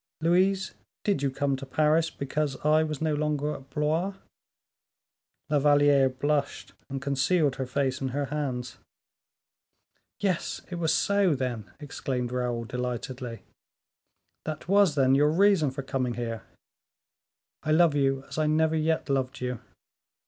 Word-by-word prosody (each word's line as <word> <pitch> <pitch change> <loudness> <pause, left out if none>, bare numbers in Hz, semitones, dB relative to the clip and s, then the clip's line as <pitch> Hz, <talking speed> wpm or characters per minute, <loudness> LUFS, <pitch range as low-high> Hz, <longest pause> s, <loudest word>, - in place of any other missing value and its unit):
Louise, 185 +3 +2 0.3
did 200 -9 +1
you 140 - +1
come 135 +1 0
to 135 - -8
Paris 155 +4 +2
because 140 -1 -2
I 155 +1 +5
was 155 -1 -3
no 155 -1 +1
longer 150 0 -1
at 135 -2 -10
Blois?" 160 +7 0 1.3
La 150 -1 +2
Valliere 145 -1 +5
blushed 145 +2 -2 0.2
and 135 0 -3
concealed 140 +2 +1
her 130 - -3
face 130 0 -1
in 135 - -1
her 140 +2 -2
hands. 130 -4 -4 1.4
"Yes, 190 -4 -1
it 175 - -4
was 160 -2 +1
so, 200 -5 +2
then!" 125 -5 -3
exclaimed 130 -4 -3
Raoul, 125 -2 -2
delightedly; 125 -1 -5 1.0
"that 155 -1 -5
was, 195 -5 +4
then, 135 -2 +4
your 145 +2 +4
reason 185 -2 +4
for 135 +1 -6
coming 130 -2 -2
here. 115 -2 -4 1.2
I 155 - -2
love 165 0 +5
you 135 -2 +1
as 145 - -6
I 155 - +2
never 160 +1 +2
yet 160 +1 0
loved 135 -2 -1
you. 125 -2 -3
145 Hz, 140 wpm, -27 LUFS, 130-155 Hz, 1.4 s, I